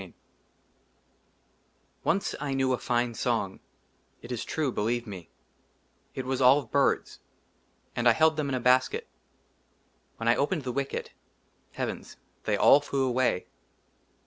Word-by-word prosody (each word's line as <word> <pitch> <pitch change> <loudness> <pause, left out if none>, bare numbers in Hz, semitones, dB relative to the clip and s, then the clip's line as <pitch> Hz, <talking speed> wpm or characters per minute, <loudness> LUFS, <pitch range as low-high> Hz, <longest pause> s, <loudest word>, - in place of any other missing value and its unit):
LXV - - -11 1.9
ONCE, 200 - +1
I 140 -2 -2
KNEW 130 -1 +2
A - - +1
FINE 120 0 0
SONG, - - -1 0.6
IT 120 - -9
IS 120 -2 -3
TRUE, 150 -4 -1
BELIEVE 120 +2 -1
ME, 95 -6 -9 0.9
IT 130 - -4
WAS 130 0 -1
ALL 130 +2 +7
OF 135 -6 -5
BIRDS, 140 -1 +1 0.8
AND 120 0 +4
I - - +6
HELD 160 +5 +4
THEM 150 -2 -2
IN 135 - -1
A - - -1
BASKET; 125 +1 +2 1.1
WHEN 115 - -4
I 120 - +5
OPENED 150 +2 0
THE 125 - -3
WICKET, 140 +2 -3 0.6
HEAVENS! - - -5 0.3
THEY - - +1
ALL 140 - +7
FLEW 135 -2 -1
AWAY. 125 -7 +1
130 Hz, 145 wpm, -28 LUFS, 120-140 Hz, 1.9 s, ALL